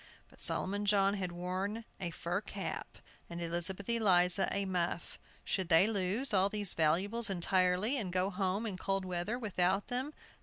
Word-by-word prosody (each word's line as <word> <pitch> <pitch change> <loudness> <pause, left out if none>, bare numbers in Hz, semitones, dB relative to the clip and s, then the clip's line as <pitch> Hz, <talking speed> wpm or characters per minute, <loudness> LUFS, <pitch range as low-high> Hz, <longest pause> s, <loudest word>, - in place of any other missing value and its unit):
But - - -19
Solomon 205 +2 -1
John 200 -1 +4
had 185 -3 -3
worn 185 +6 -4
a 180 -3 -2
fur 170 +3 -3
cap, - - -6 0.3
and 170 0 -6
Elizabeth 175 +3 -1
Eliza 190 -5 +3
a 200 0 -1
muff. 175 -2 -3 0.3
Should 190 -3 -1
they 165 +3 +6
lose 210 +4 +2
all 195 0 +4
these 205 -2 +1
valuables 190 +9 +2
entirely, 185 +6 +2
and 190 -6 -4
go 185 +2 0
home 195 +3 -1
in 200 -4 -4
the - - -13
cold 195 -1 0
without 185 +1 -1
them? 255 +4 -2
190 Hz, 160 wpm, -33 LUFS, 180-205 Hz, 0.3 s, they